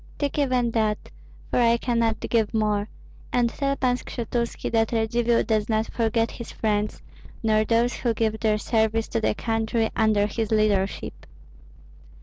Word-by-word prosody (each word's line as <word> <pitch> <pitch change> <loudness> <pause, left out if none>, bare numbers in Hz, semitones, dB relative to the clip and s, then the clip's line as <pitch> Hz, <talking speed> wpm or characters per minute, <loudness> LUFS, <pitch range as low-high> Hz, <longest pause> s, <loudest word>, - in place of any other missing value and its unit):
Take 285 0 -1
even 255 -4 +1
that, 215 -2 -1 0.4
for - - +2
I 235 -1 +4
cannot 230 -2 0
give 225 -2 0
more, 210 -1 0 0.4
and 240 -1 +2
tell 275 -1 -1
Pan 250 -2 +1
Skshetuski 235 -1 -3
that 225 -1 +2
Radzivill 235 +1 +1
does 215 -1 0
not 220 0 0
forget 230 0 +1
his 235 - -8
friends, 210 -1 -1 0.4
nor 215 -1 +3
those 235 +2 +1
who 235 -2 0
give 220 -1 0
their 215 -1 +2
service 220 0 +1
to 225 - -1
the 215 - +1
country 225 0 -1
under 215 -2 +3
his 215 +1 -2
leadership." 210 -3 0
225 Hz, 150 wpm, -25 LUFS, 215-235 Hz, 0.4 s, I